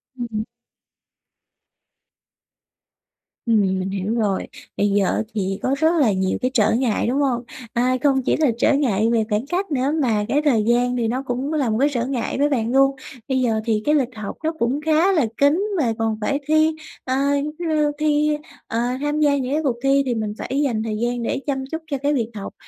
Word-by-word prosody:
Ừm, 245 -2 -4
ừm. 215 0 -2 3.0
Ừm, 225 -3 +3 0.2
mình 185 - -3
hiểu 195 +2 -2
rồi. 205 -5 0 0.3
Bây 205 - +2
giờ 200 -1 +2
á, - - 0
thì 195 -2 -2
có 265 - +1
rất 320 +3 +3
là 230 -7 +4
nhiều 190 -1 0
cái 255 - 0
trở 220 -5 +3
ngại, 235 -3 +1
đúng 260 +4 0
hông? 250 -4 0 0.3
A, 250 +2 +2
không 270 -2 +3
chỉ - - +2
là 300 -5 +3
trở 250 - +3
ngại 230 -6 +2
về 225 -2 +3
khoảng 210 +4 0
cách 360 +3 -2
nữa, 275 0 +1
mà 220 -6 +1
cái 290 +2 +2
thời 235 -7 +3
gian 245 +2 +2
thì 235 -2 0
nó 255 +4 -2
cũng 260 +4 -2
là 280 -6 +1
một 215 - 0
cái 285 - +3
trở 240 -1 0
ngại 260 -3 -2
với 290 +1 +2
bạn 235 -4 0
luôn. 270 +1 +4 0.3
Bây 265 -1 +1
giờ 220 -3 +1
thì 220 -2 +1
cái 300 - +3
lịch 255 -4 0
học 215 -2 -6
nó 320 - +1
cũng 250 +5 0
khá 320 +5 +3
là 315 -9 +2
kín, 300 +8 +3
mà 240 -8 +1
còn 220 -1 0
phải 280 +6 0
thi, 310 +1 +3 0.3
ờ, 260 - -1 0.3
giống 300 - -3
như, 310 -3 +1
thi 300 0 +2 0.3
ờ, 230 - -2 0.2
tham 295 +1 -1
gia 290 -2 +3
những 260 -1 -3
cái 310 - +1
cuộc 265 -5 +1
thi, 275 0 +3
thì 245 - -1
mình 215 -2 -2
phải 275 +3 -2
dành 230 -6 0
thời 215 -1 -3
gian 240 +1 -1
để 270 - -1
chăm 270 -2 -1
chút 320 0 -3
cho 280 - 0
cái 285 +2 0
việc 235 -5 -1
học, 200 - -6
255 Hz, 220 wpm, -21 LUFS, 225-290 Hz, 3.0 s, là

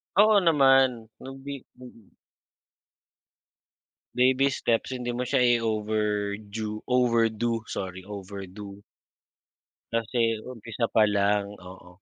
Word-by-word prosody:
Oo 210 +1 +6
naman. 135 - +3
Nagbi 135 0 -9
mm. 125 -4 -16 2.0
Baby 130 +2 +3
steps. 115 -1 0
Hindi 120 -1 -3
mo 125 +1 -2
siya 130 +1 +1
i-overdue, 110 -2 -1
overdo 115 -2 +1
sorry, 95 -1 -5
overdo. 100 0 -8 1.2
Kasi 115 -1 0
umpisa 115 -1 -4
pa 110 - +4
lang, 100 0 +1
oo. 90 0 -14
115 Hz, 90 wpm, -26 LUFS, 105-125 Hz, 2.0 s, Oo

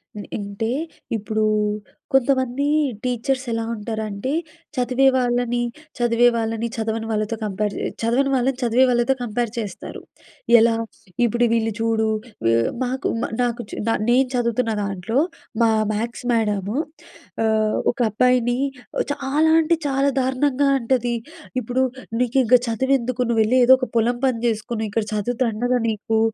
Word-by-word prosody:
హ్మ్. 205 - -7
అంటే 205 +3 -3 0.5
ఇప్పుడు 215 +1 -1 0.7
కొంతమంది 265 0 +2 0.4
టీచర్స్ 255 +1 -1
ఎలా 230 0 -1
ఉంటారంటే, 215 +2 -4 0.4
చదివే 255 +1 +1
వాళ్ళని 245 -1 +1 0.4
చదివే 240 0 +3
వాళ్ళని, 225 0 -1
చదవని 225 -1 -2
వాళ్ళతో 215 +1 -1
కంపేర్ 205 0 -2
చే - - -2 0.2
చదవని 245 +5 +2
వాళ్ళని 260 +1 +2
చదివే 240 +2 +4
వాళ్ళతో 240 +2 +2
కంపేర్ 235 0 -2
చేస్తారు. 205 -5 -6 0.6
ఎలా? 230 0 +4 0.5
ఇప్పుడు 240 +1 +2
వీళ్ళు 225 -1 +1
చూడు 225 -1 +1 0.4
ఎ - - +3 0.3
మాకు 255 +1 -2
మ - - -1 0.2
నాకు 240 0 -1
చు - - -7
నా 225 - +3 0.2
నేను 255 +2 +4
చదువుతున్న 235 -1 0
దాంట్లో, 200 +4 -2 0.4
మా 230 - +5 0.2
మ్యాథ్స్ 235 +3 -4
మ్యాడము 210 -2 0 0.7
ఆహ్, 215 -1 +2
ఒక 245 - -17
అబ్బాయిని 245 +2 +2 0.6
చాలా 290 +3 +1
అంటే 330 +1 +2
చాలా 275 +1 +2
దారుణంగా 265 +2 +1
అంటది. 240 0 0 0.5
ఇప్పుడు 250 +3 0 0.4
నీకింక 250 0 +3
చదువెందుకు 255 +1 0
నువ్వెళ్ళి 225 +2 +3
ఏదో 255 +2 +8
ఒక 255 - -3
పొలం 240 +2 +1
పని 250 -3 0
చేసుకుని 220 0 -2
ఇక్కడ 225 +1 0
చదువు 220 +3 -1
దండగా 245 +2 0
నీకు. 220 +1 -1
235 Hz, 130 wpm, -22 LUFS, 220-255 Hz, 0.7 s, ఏదో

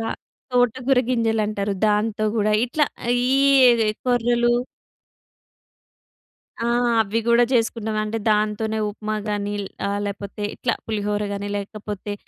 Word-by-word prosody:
ర 225 - -3 0.5
తోటగూర 250 +1 +2
గింజలంటారు. 215 -4 0
దాంతో 215 +1 +1
గూడా 215 -1 +2
ఇట్లా, 290 +5 +1 0.3
ఈ 255 -4 +4
కొర్రలు 240 -1 +2 2.1
ఆ! - - -3 0.4
అవి 220 +2 -1
గూడా 235 +1 +5
జేసుకున్నాం. 225 -2 0
అంటే, 215 +1 -3
దాంతోనే 215 +1 0
ఉప్మా 215 +1 -4
గానీ, 205 0 -2
ల్ - - -6 0.2
ఆహ్, 200 0 -1
లేపోతే 200 +1 -6
ఇట్లా 235 -2 -1
పులిహోర 210 -1 -2
గానీ, 200 0 -4
లేకపోతే 205 0 -6
220 Hz, 110 wpm, -22 LUFS, 210-240 Hz, 2.1 s, గూడా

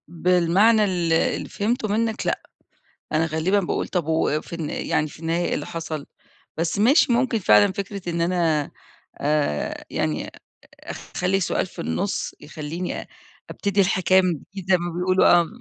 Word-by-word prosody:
بالمعنى 180 +6 +3
ال 175 -4 0
اللي 165 - +1
فهمته 220 +2 -1
منك 220 +2 -1
لأ، - - 0 0.7
أنا 160 +1 +2
غالبًا 160 +6 +1
باقول 180 - -2
طب 175 -5 -1
و 160 -1 +1
في - - -15
الن 160 -3 -4
يعني 155 - -1
في 150 - -14
النهاية 165 +1 0
إيه - - 0
اللي - - -4
حصل، 160 -3 -5 0.5
بس 165 +4 -1
ماشي 245 +4 +5
ممكن 235 -1 +2
فعلًا 105 - +5
فكرة 200 -2 -5
إن 170 0 -2
أنا 170 -4 +1 0.5
آآ 145 - -1
يعني 75 -1 -2 0.6
أخلّي 185 +2 -2
سؤال 190 - 0
في 185 - -14
النص 195 +1 -2
يخلّيني 160 +3 -5 0.4
أبتدي 200 0 0
الحكاية 190 0 +3
من 180 -2 +1
جديد 190 +4 -10
زي 185 - +6
ما 175 0 -4
بيقولوا 185 +1 +3 0.2
آه 170 - -3
175 Hz, 160 wpm, -23 LUFS, 160-195 Hz, 0.7 s, زي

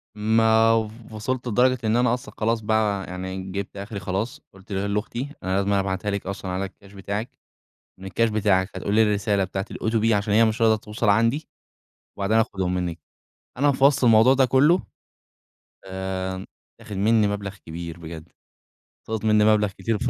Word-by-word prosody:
ما 110 +1 +4
و 110 -1 +1 0.3
وصلت 125 +3 -3
لدرجة 125 +3 +3
إن 110 +1 +1
أنا 120 -1 +3
أصلًا 125 - -5
خلاص 115 +1 0
بقى 105 -3 0
يعني 95 +1 -5
جبت 100 +1 -5
آخري 100 +1 -6
خلاص، 100 +10 -3
قُلت 95 +1 -16
ل 100 +1 -1
لأختي: 120 +5 -3
"أنا 95 0 -1
لازمًا 100 0 +1
أبعتها 95 +1 -2
لِك 100 -1 -3
أصلًا 95 -1 -5
على 95 +2 -2
الكاش 100 +1 -14
بتاعِك 100 +4 -4 0.7
من 95 - -10
الكاش 115 +4 +1
بتاعِك 100 -3 +2
فتقولي 105 +2 +2
لي 105 - +2
الرسالة 100 -1 +1
بتاعة 95 +1 -3
الOTP 115 0 0
عشان 105 0 +1
هي 115 +2 +6
مش 110 +1 -1
راضية 110 -1 +5
توصل 105 +1 -2
عندي، 115 +8 +2 0.7
وبعدها 100 +3 +2
هآخدهم 95 -5 -1
منِك." 85 -2 -3 0.6
أنا 145 +1 +4
في 135 0 +1
وسط 140 -1 +4
الموضوع 115 +3 +6
ده 135 - +4
كلّه 145 +8 +4 1.0
آآ، 95 0 -4 0.3
اتاخد 110 -3 -8
منّي 105 +1 +3
مبلغ 100 -1 -4
كبير 85 +1 -7
بجد، 80 0 -9 0.8
سقط 110 -1 -3
منّي 105 -1 +4
مبلغ 105 -1 +4
كتير 95 +4 -2
في 125 - -1
105 Hz, 175 wpm, -24 LUFS, 95-115 Hz, 1.0 s, هي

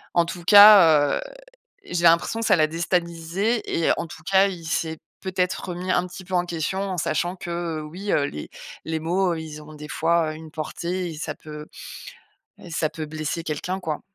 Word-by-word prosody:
en 170 -1 +4
tout 175 +1 -7
cas, 190 -7 +8
heu, - - -4 0.7
j'ai 175 -1 -2
l'impression 170 +7 +4
que 230 - -1
ça - - +5
l'a 155 -2 +4
déstabilisé 170 +6 -1
et - - +3
en 170 - -3
tout 160 - -12
cas, 195 +1 +5
il 175 -4 -7
s'est 160 0 -2 0.2
peut-être 185 0 -2
remis 180 +1 -4
un 180 0 +2
petit 180 +1 -10
peu 185 - -6
en 175 0 +2
question. 175 +3 -2
En 185 - -4
sachant 175 +3 -1
que, 170 -3 -4
oui, 180 +7 -5
heu, 145 - +3
les 75 - -7 0.4
les 160 0 -3
mots, 175 +2 +1
ils 160 -2 -7
ont 155 +1 -12
des 150 0 -9
fois 165 0 +1
une 160 0 -11
portée 175 +3 -4
et - - -9
ça - - -4
peut 150 -1 -10 1.0
et 175 - -11
ça 155 -1 0
peut 155 -1 -6
blesser 155 +2 -4
quelqu'un, 180 +4 -3
quoi. 155 -4 -3
170 Hz, 195 wpm, -24 LUFS, 155-180 Hz, 1.0 s, cas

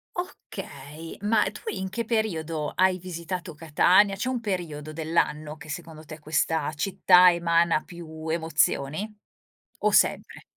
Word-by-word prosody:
Okay, 155 - -8
ma 210 -1 +2
tu - - -11
in 190 -1 -3
che 210 +5 -3
periodo 165 -10 -1
hai 185 0 +3
visitato 180 -1 -6
Catania. 180 +6 +4
C'è 205 - -2
un 255 -2 -1
periodo 170 -8 -4
dell'anno 155 -1 -1
che 155 - -13
secondo 160 0 -7
te 155 +1 -10
questa 155 0 0
città 180 +2 +5
emana 170 -1 +2
più 160 -2 -9
emozioni? 160 +2 0 0.7
O - - +2
sempre? - - +2
165 Hz, 130 wpm, -26 LUFS, 155-185 Hz, 0.7 s, città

